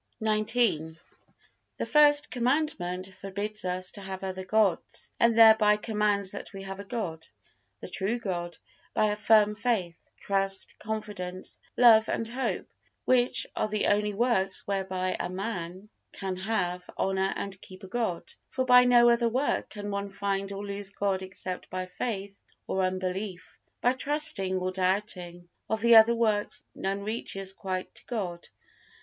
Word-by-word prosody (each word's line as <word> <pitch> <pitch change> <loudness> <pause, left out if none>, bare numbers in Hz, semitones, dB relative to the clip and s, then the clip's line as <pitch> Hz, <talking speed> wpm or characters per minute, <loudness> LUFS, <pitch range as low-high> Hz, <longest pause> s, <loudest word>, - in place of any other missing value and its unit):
XIX. 215 -7 +1 0.8
The - - -2
First 295 0 +5
Commandment 235 - -1
forbids 205 +3 -5
us 185 0 -2
to 200 - -7
have 190 0 -6
other 190 0 -4
gods, 200 -2 0
and 230 -1 +4
thereby 220 -2 +7
commands 210 -3 0
that 200 - -8
we 195 0 -7
have 195 0 -7
a - - -5
God, 195 -7 -5 0.5
the - - -6
true 195 +6 -1
God, 175 -6 -4 0.4
by 215 -1 +3
a - - -1
firm 210 0 +4
faith, 205 -7 -2
trust, 195 -1 -1
confidence, 205 -4 -5 0.2
hope 225 -3 +7
and 225 - -1
love, 265 - -1 0.4
which 250 -1 +3
are - - 0
the 215 0 -1
only 210 0 +1
works 195 -4 +1
whereby 190 -2 -1
a - - -2
man 185 -1 -5 0.3
can 190 -2 -4
have, 180 -2 -2
honor 190 0 +1
and 195 -1 -6
keep 185 +1 -12
a - - -8
God; 200 -4 -2 0.3
for 260 -1 -1
by 250 -1 +7
no 240 -1 +6
other 235 0 +4
work 260 +5 0
can 205 -1 -6
one 200 0 -3
find 195 0 -2
or 200 +1 -5
lose 200 -1 -4
God 195 -1 -1
except 185 -1 -5
by 185 0 -3
faith 200 0 -4 0.3
or 190 - -1
unbelief, 185 +1 -3 0.2
by 245 - +3
trusting 285 -9 0
or 185 0 -1
doubting; 185 -2 -2 0.2
of 220 -1 -1
the 235 0 +6
other 225 +1 +8
works 215 -3 0
none 195 +1 -3
reaches 195 -3 -3
quite 185 -1 -4
to - - -11
God. 185 -8 -4
200 Hz, 155 wpm, -28 LUFS, 185-220 Hz, 0.8 s, other